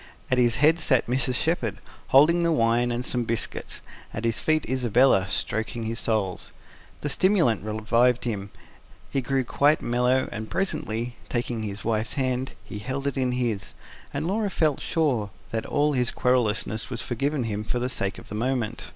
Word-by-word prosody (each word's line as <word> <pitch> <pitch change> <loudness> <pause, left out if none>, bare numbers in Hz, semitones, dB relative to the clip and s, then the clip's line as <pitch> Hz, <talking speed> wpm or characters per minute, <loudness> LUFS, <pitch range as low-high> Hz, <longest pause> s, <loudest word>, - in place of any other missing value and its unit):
At 130 - +3
his 120 -2 +4
head 155 +6 +4
sat 130 -7 +3
Mrs. 125 +1 0
Shepherd, 125 - 0 0.3
holding 155 +6 +6
the 170 0 +2
wine 120 -2 +2
and 120 +1 -2
some 125 -1 0
biscuits; 115 0 -3 0.3
at 115 - -3
his 115 -1 0
feet 155 -1 +1
Isabella, 125 -5 +3
stroking 110 +4 -2
his 115 +1 -3
soles. 105 -5 -1 0.5
The - - -2
stimulant 165 - +3
revived 115 +3 +2
him; 100 -4 -3 0.6
he 135 - 0
grew 135 +1 0
quite 145 +5 +3
mellow, 125 +2 +1
and 110 +1 -5
presently, 120 - -2
taking 120 -2 -2
his 100 -1 -5
wife's 110 -1 0
hand, 130 -1 -1
he 105 - -7
held 130 +6 -4
it 140 - -1
in 130 -2 0
his 115 -5 -2 0.4
and 145 +2 -3
Laura 205 +3 0
felt 155 -6 +1
sure 130 -11 0 0.2
that 115 -1 -2
all 150 0 +2
his 125 -2 +1
querulousness 115 -3 0
was 120 -3 -4
forgiven 135 +3 -1
him 105 -2 -3
for 115 - -2
the 125 +1 -1
sake 100 -6 -2
of - - -12
this 105 - -6
moment. 120 -1 -2
125 Hz, 175 wpm, -25 LUFS, 110-135 Hz, 0.6 s, holding